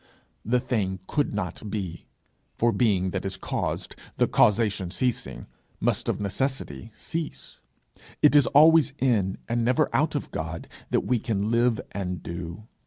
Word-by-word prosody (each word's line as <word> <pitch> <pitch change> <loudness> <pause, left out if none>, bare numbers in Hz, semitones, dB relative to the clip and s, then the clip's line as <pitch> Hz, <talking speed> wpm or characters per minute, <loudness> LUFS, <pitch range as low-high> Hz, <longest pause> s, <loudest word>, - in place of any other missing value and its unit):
The 125 +3 +2
thing 105 -7 -1
could 145 +6 0
not 105 +1 -4
be; 95 -5 -5 0.5
for 120 0 +2
being 100 -7 +2
that 95 - -3
is 95 -1 -3
caused, - - -3 0.2
the - - +4
causation 105 -4 +2
ceasing, 90 - -2 0.3
must - - +1
of - - -1
necessity 100 - -2
cease. 165 -1 -6 0.6
It 150 0 +6
is 145 -4 +6
always 155 0 +6
in, 105 -7 +1
and 115 0 0
never 125 +2 +2
out - - +2
of - - -3
God, - - -5 0.2
that - - +2
we 125 -2 0
can 105 -1 -1
live 120 -1 +3
and 90 -3 -4
do. 85 +3 -6
110 Hz, 150 wpm, -26 LUFS, 95-125 Hz, 0.6 s, It